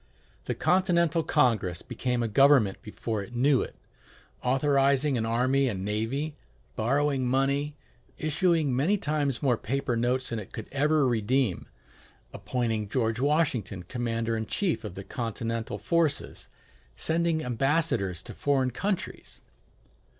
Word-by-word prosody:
The - - -2
Continental 170 -3 +2
Congress 110 - +1
became 125 -1 -2
a - - 0
government 125 -3 +4
before 110 0 -4
it 115 +5 -9
knew 135 +2 +3
it, - - -6 0.7
authorizing 140 +1 +2
an 115 -2 -1
army 130 +4 +2
and 95 -4 -4
navy, 120 +9 -2 0.4
borrowing 135 +3 +1
money, 140 +3 +1 0.4
issuing 155 -3 +1
many 165 +11 +2
times 145 - -1
more 125 -4 +3
paper 130 +1 -2
notes 125 +2 0
than 115 - -2
it 100 - -10
could 110 - -6
ever 150 0 +2
redeem, 120 -3 0 0.7
appointing 115 -5 -2
George 115 -1 0
Washington 130 - 0
commander 115 +1 -2
in 110 -1 -3
chief 190 -5 -1
of 105 -4 -7
the 100 - -7
Continental 115 0 -3
forces, 165 -4 -1 0.5
sending 165 -1 +1
ambassadors 125 - 0
to - - -9
foreign 135 -3 +1
countries. 195 - -4
130 Hz, 130 wpm, -28 LUFS, 115-145 Hz, 0.7 s, government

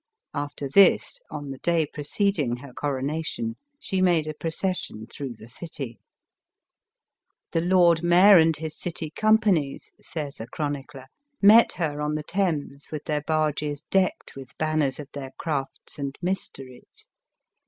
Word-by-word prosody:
After 145 -1 -4
this, 200 - +4
on 145 -1 -6
the 135 - -8
day 170 -2 +2
preceding 150 - -1
her 125 +1 -11
coronation, 155 - -2 0.2
she 190 -11 -1
made 175 -4 +3
a 155 - -4
proces 175 +4 -2
sion 110 +1 -8
through 135 0 -7
the 110 +1 -13
city. 135 -2 -7 0.7
" - - -59
The 165 - +1
lord 175 -2 +4
mayor 180 +3 +7
and 160 -1 +3
his 155 0 -5
city 165 -3 -5
companies," 210 -8 +2
says 150 -3 -5
a 115 - -6
chronicler, 145 -2 -5 0.3
"met 215 +3 +7
her 150 -4 -2
on 150 0 -1
the 155 - -3
Thames 150 -6 -2
with 155 -2 -5
their 150 -1 -1
barges 150 -1 -1
decked 190 -1 +1
with 135 -2 -11
banners 155 -4 0
of 145 - -7
their 135 -2 -7
crafts 145 -3 -4
and 140 -1 -4
mysteries. 155 -8 -5
155 Hz, 145 wpm, -25 LUFS, 140-175 Hz, 0.7 s, mayor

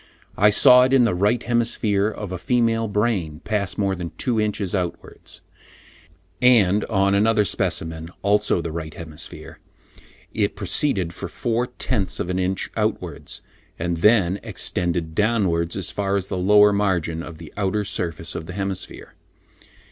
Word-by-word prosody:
I 105 +2 +5
saw 125 +4 +7
it 130 +1 +2
in 130 -2 +6
the 115 - +2
right 105 +6 +1
hemisphere 115 -4 +1
of 105 -3 -5
a 90 - -4
female 115 0 +1
brain 105 -8 -1
pass 100 -3 -1
more 100 -2 +1
than 90 -2 -5
two 115 -4 0
inches 105 -3 -1
outwards; 90 -3 -5 1.0
and 105 -5 +4
on 100 -2 +1
another 105 +1 +3
specimen, 80 -3 -2
also 105 -2 +2
the 85 - -4
right 80 -1 -6
hemisphere, 80 -3 -8 0.7
it - - 0
proceeded 95 - 0
for - - -7
four 120 +1 -1
tenths 125 -5 -2
of 90 - -2
an 90 - -1
inch 95 +1 -1
outwards, - - -3 0.3
and 85 0 -2
then 100 0 +3
extended 85 -2 -2
downwards, 95 -5 +1
as 95 -3 -3
far 100 -1 -1
as 95 -1 -2
the - - -2
lower 105 +2 +5
margin 90 -5 0
of 85 -2 -9
the 80 -2 -12
outer 105 +1 -1
surface 85 -3 -3
of 80 - -6
the 90 - -7
hemisphere. 100 -1 -5
100 Hz, 155 wpm, -22 LUFS, 85-110 Hz, 1.0 s, saw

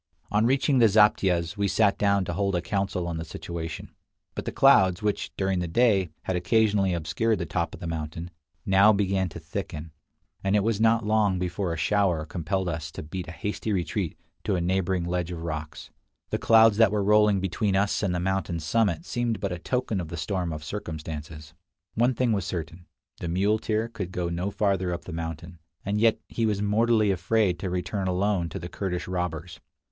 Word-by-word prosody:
On 105 +2 +3
reaching 135 +1 +2
the 115 - +7
zaptiehs, 100 -4 +3
we 100 0 +1
sat 100 0 +3
down 100 -2 +2
to 85 - -3
hold 100 +1 0
a 90 - 0
council 95 -3 -1
on 85 -1 -3
the 80 - -4
situation; 85 0 -6 0.4
but - - -5
the - - -2
clouds, 95 0 +5
which, 105 -1 -1
during 95 -1 0
the 90 - -2
day, 100 -1 +3
had 95 - -2
occasionally 100 +1 +2
obscured 110 +7 0
the 85 - -3
top - - -2
of - - -14
the - - -7
mountain, 80 +1 -5 0.3
now 100 +2 +6
began 95 -2 +1
to - - -9
thicken, 75 +1 -6 0.5
and 95 +1 +2
it 105 - +3
was 110 -1 0
not 115 0 +3
long 105 -3 +2
before 90 0 -2
a 85 - -3
shower 90 -2 +1
compelled 90 +3 -2
us 80 -3 -3
to - - -6
beat 90 +3 -6
a - - -6
hasty 105 +4 -4
retreat 90 -2 -2 0.3
to 100 - 0
a - - 0
neighboring 95 0 0
ledge 90 0 -2
of 85 -2 -6
rocks. 80 -2 -6 0.4
The - - 0
clouds 110 -2 +6
that 110 -3 +5
were 105 -1 0
rolling 105 -1 +4
between 95 +2 0
us 100 +1 +1
and 95 -4 0
the - - 0
mountain 95 -2 -1
summit 90 +1 0
seemed 120 -3 -1
but 100 -2 -2
a 90 - -4
token 120 -3 -1
of 85 - -6
the 85 - -6
storm 90 0 -2
of 75 0 -6
circumstances. 80 -3 -7 0.4
One 120 +3 +2
thing 125 -1 +1
was 100 -3 0
certain, 85 -2 -6 0.3
the 85 - -4
muleteer 105 +5 +1
could 95 -6 -6
go 90 -1 -2
no 85 +3 -2
farther 95 -3 0
up - - -10
the 90 - -7
mountain, 80 +1 -6 0.3
and 100 +1 0
yet 115 -1 +4
he 115 -1 -1
was 105 -2 0
mortally 110 +1 +2
afraid 95 0 +1
to 95 - -3
return 90 +2 -2
alone 90 -1 0
to 90 - -6
the 85 -2 -6
Kurdish 90 -1 -4
robbers. 90 -2 -4
95 Hz, 200 wpm, -26 LUFS, 85-105 Hz, 0.5 s, the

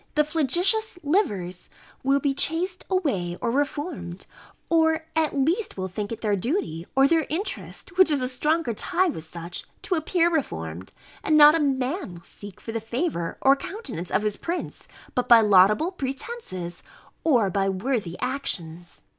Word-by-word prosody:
The 300 - +5
flagitious 350 - +1
livers 200 - -1 0.3
will 275 +1 +2
be 280 0 0
chased 355 +6 0
away, 200 - -1
or 235 - -1
reformed; 285 - -3 0.4
or 320 -1 +2
at 315 -2 +1
least 330 - 0
will 190 0 -3
think 205 +3 -5
it 230 - -5
their 210 -2 +1
duty, 185 - -2
or 270 +1 +6
their 320 0 +2
interest, 370 +1 -5
which 375 - +7
is 295 -2 +3
a 255 - -1
stronger 300 +1 0
tie 360 - +1
with 160 - -5
such, 170 +2 -5 0.2
to - - -1
appear 335 +1 +2
reformed; 85 - -3 0.3
and 310 - +3
not 300 0 +9
a 330 - +2
man 270 - -1
will 170 - -12
seek 200 +2 -11
for 225 - -7
the 225 0 -3
favour 225 - -2
or 270 +1 +6
countenance 275 - -6
of 210 - +1
his 210 -1 -1
prince, 345 +1 -4 0.3
but 250 -1 -1
by 235 -2 +8
laudable 210 - +5
pretences, 265 - -6 0.4
or 240 -11 +3
by 195 +1 +1
worthy 195 -3 -2
actions. 175 - -3
270 Hz, 165 wpm, -25 LUFS, 195-325 Hz, 0.4 s, not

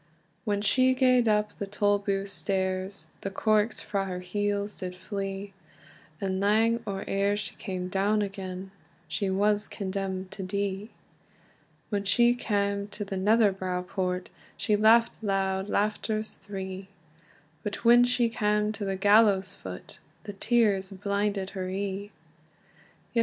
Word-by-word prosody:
When 205 -2 0
she 255 +5 +4
gaed 255 -2 +4
up 210 -1 +2
the 200 - -3
Tolbooth 200 -1 0
stairs, 190 0 -1
The 195 - -3
corks 215 +2 +1
frae 200 -2 -2
her 180 -1 -4
heels 205 +2 -2
did 180 -1 -5
flee; 195 +1 -5 0.7
And 190 -1 -1
lang 220 +3 +3
or 195 -1 -3
eer 200 +1 +1
she 210 0 -4
cam 185 -1 -4
down 200 +3 +1
again, 190 -1 -6 0.4
She 200 - -1
was 205 +2 +2
condemned 190 -1 -4
to 200 - -7
die. 200 +2 -2 1.0
When 205 -2 -1
she 240 +4 +4
cam 200 -4 -1
to 205 0 -5
the 195 - -4
Netherbow 190 -3 +2
Port, 180 -1 -2 0.3
She 210 - +1
laughed 225 +2 +4
loud 195 -1 0
laughters 215 +1 -1
three; 190 -1 -7 0.7
But 210 +2 -5
when 240 +1 +8
she 245 -1 +2
cam 210 -2 +1
to 210 -1 -5
the 195 0 -1
gallows 200 -1 +4
foot, 90 -1 -9 0.2
The 205 -1 -7
tears 200 -3 +2
blinded 200 0 -1
her 185 -1 -4
ee. 200 +1 -3
200 Hz, 135 wpm, -28 LUFS, 190-210 Hz, 1.0 s, when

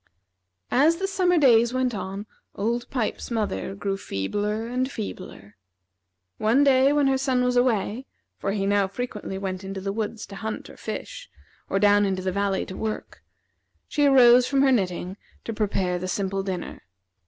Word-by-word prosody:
As 300 +6 +4
the 385 - -2
summer 370 -2 +2
days 240 -4 +5
went 255 -1 +1
on, 195 0 -5 0.3
Old 235 +4 -2
Pipes's 245 -5 -2
mother 215 -4 -2
grew 195 -1 -2
feebler 205 - -2
and 250 +2 -1
feebler. 185 - -8 0.8
One 235 +6 +3
day 270 0 +5
when 290 -1 +3
her 270 -1 +2
son 260 -2 +1
was 250 0 +1
away, 245 0 +1 0.3
for 195 - -1
he 195 -1 -1
now 200 -1 +2
frequently 210 -2 -5
went 190 -1 -4
into 195 0 -5
the 195 +1 -3
woods 220 0 -4
to 200 - -11
hunt 220 +1 -5
or - - -15
fish, - - -7 0.4
or - - +1
down 205 0 +4
into 190 -1 -2
the 185 - 0
valley 200 0 0
to 185 - -8
work, 220 +1 -5 0.7
she 290 -1 +2
arose 250 -2 +7
from 275 0 +2
her 270 - +4
knitting 185 -4 -1 0.3
to 230 - -4
prepare 195 -4 -1
the 185 - -4
simple 195 +1 -1
dinner. 185 -3 -5
215 Hz, 170 wpm, -25 LUFS, 195-255 Hz, 0.8 s, arose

